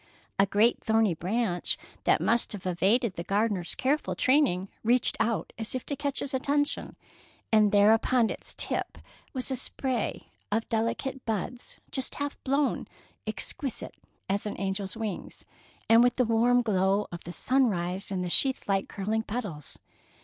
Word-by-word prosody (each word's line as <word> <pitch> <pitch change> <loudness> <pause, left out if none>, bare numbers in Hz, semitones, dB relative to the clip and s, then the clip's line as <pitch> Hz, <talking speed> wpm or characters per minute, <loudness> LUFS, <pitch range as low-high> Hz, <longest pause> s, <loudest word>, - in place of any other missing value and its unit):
A 195 - +5
great 215 +5 +3
thorny 220 -4 +3
branch 180 +2 -1 0.3
that - - +4
must 235 -1 +1
have 200 -2 -8
evaded 195 +5 +2
the 170 - -5
gardener's 200 -1 0
careful 285 +3 0
training 255 -9 +2 0.2
reached 240 +2 +3
out 225 -1 0
as 225 +3 -3
if 255 - -4
to 285 - -3
catch 280 0 -2
his 280 - -3
attention, 285 +2 0 0.6
and 215 -2 +5
there 205 +1 +6
upon 235 +1 +2
its - - -5
tip - - -1 0.3
was 260 0 -1
a - - +1
spray 255 -1 -2 0.2
of 225 +2 0
delicate 235 +4 -1
buds, 225 +3 -4
just 265 - 0
half 285 0 -4
blown, 275 +1 0 0.4
exquisite 270 -6 -3 0.3
as 200 +2 -1
an 210 - -5
angel's 195 +1 -3
wings, 215 -5 -5 0.4
and 225 +1 +7
with 245 0 +3
the 250 - +2
warm 240 +2 +3
glow 200 -1 +2
of 175 - -7
the 175 - -7
sunrise 195 -6 0
in 190 -2 -2
the - - -2
sheathlike, 200 -7 +2
curling 215 +3 -1
petals. 205 - -5
225 Hz, 155 wpm, -28 LUFS, 195-255 Hz, 0.6 s, and